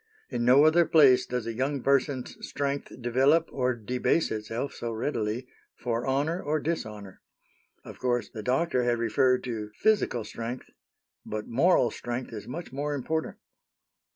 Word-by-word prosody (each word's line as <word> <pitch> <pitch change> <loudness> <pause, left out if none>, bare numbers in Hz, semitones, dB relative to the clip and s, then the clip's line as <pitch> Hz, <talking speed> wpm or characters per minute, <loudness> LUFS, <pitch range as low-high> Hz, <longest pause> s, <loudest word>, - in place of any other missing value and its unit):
In 120 -2 -1
no 130 +4 +6
other 165 +2 +5
place 140 -6 +6
does 125 -2 -3
a 115 - -3
young 135 +3 -2
person's 135 -1 +1
strength 140 0 -3
develop 135 +7 +3
or 125 -2 0
debase 125 +8 0
itself 110 +5 -3
so 120 - -4
readily, 115 0 -2 0.3
for 120 0 -2
honor 145 +7 0
or 155 +1 0
dishonor. 105 - -5 0.6
Of - - -10
course 120 -3 0
the 110 - -8
doctor 130 +4 +1
had 120 -1 +1
referred 125 +3 +2
to 110 -4 -4
physical 210 - +1
strength; 115 +3 -6 0.5
but 105 0 -5
moral 130 -1 +3
strength 120 +1 -5
is 105 - -7
much 160 +2 -6
more 145 +2 -2
important. 160 +4 -3
125 Hz, 150 wpm, -28 LUFS, 115-145 Hz, 0.6 s, no